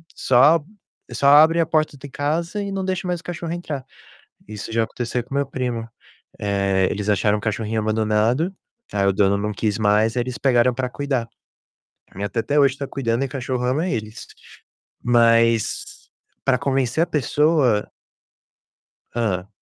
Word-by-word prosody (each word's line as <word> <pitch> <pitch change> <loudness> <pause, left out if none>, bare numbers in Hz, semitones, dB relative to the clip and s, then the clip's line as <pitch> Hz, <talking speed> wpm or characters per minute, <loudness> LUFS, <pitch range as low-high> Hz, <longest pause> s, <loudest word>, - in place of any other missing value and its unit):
só 145 +5 +4 0.5
só 140 - +1
abrem 155 +4 +7
a - - +2
porta 155 -2 0
de 140 +1 -10
casa 165 +8 -2
e 200 -1 -4
não 195 -1 -3
deixa 185 -1 -2
mais 175 -1 -1
o - - -37
cachorro 170 -1 -5
entrar. 150 -6 -5 0.6
Isso 105 +1 -7
já 115 0 +2
aconteceu 120 +1 -3
com 135 - -9
meu 140 - +1
primo. 125 -4 -3 0.5
Eh, 100 -2 +1
eles 105 +1 -3
acharam 105 +1 +2
um - - -7
cachorrinho 110 0 -2
abandonado, 110 - +1 0.4
aí 100 -1 +1
o 100 - +3
dono 100 +1 +2
não 105 +1 -2
quis 105 0 -1
mais, 110 +2 +2
eles 125 0 -2
pegaram 125 -2 +3
pra 130 0 -2
cuidar. 135 -4 -2 0.8
A - - -20
minha 100 +1 -3
tia 115 - -2
até 145 +5 0
hoje 135 -2 +4
está 140 0 -5
cuidando 120 -2 -2
e - - +1
o - - -9
cachorro 125 -1 -3
ama 145 +9 0
eles. 110 -5 -5 0.8
Mas, 115 -2 +2 0.3
pra 130 -2 +2
convencer 135 +3 0
a - - -14
pessoa 150 -6 +1 1.2
Hã. 100 -6 -1
125 Hz, 165 wpm, -22 LUFS, 110-145 Hz, 1.2 s, abrem